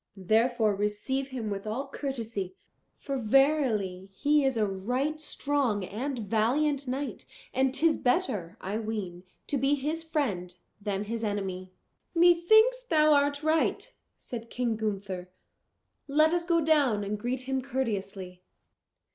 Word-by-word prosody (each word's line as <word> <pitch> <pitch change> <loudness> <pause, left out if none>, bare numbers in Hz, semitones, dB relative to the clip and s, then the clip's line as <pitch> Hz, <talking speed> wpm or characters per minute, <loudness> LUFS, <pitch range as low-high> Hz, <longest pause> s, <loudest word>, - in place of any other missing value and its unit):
therefore 220 +3 +2
receive 210 +7 -1
him 240 -6 -4
with 200 +1 -4
all 255 +6 -3
courtesy; 230 -9 -4 0.4
for 275 -1 -4
verily 220 -7 +2
he 290 +8 +2
is 265 -3 +1
a 215 - +3
right 250 +11 -2
strong 280 -9 0
and 255 +8 -4
valiant 255 +7 +1
knight, 270 +3 -4 0.3
and 265 0 +2
'tis 315 +2 +3
better, 235 - 0
I 200 +4 -3
ween, 210 -6 -4 0.2
to 285 - -1
be 275 +3 +3
his 300 +4 -2
friend 220 - -2 0.3
than 200 -1 -2
his 230 +2 -4
enemy." 190 -3 -3 0.4
"Methinks 355 +9 +5
thou 310 -9 +4
art 285 0 +2
right," 320 +10 +1 0.2
said 230 -2 -8
King 240 -2 -1
Gunther. 195 -4 -4 0.8
"Let 310 +3 +4
us 345 -1 0
go 340 -2 +3
down 285 -9 +3
and 205 +1 -3
greet 245 +3 -2
him 265 0 -2
courteously." 200 -8 -4
245 Hz, 135 wpm, -28 LUFS, 205-290 Hz, 0.8 s, Methinks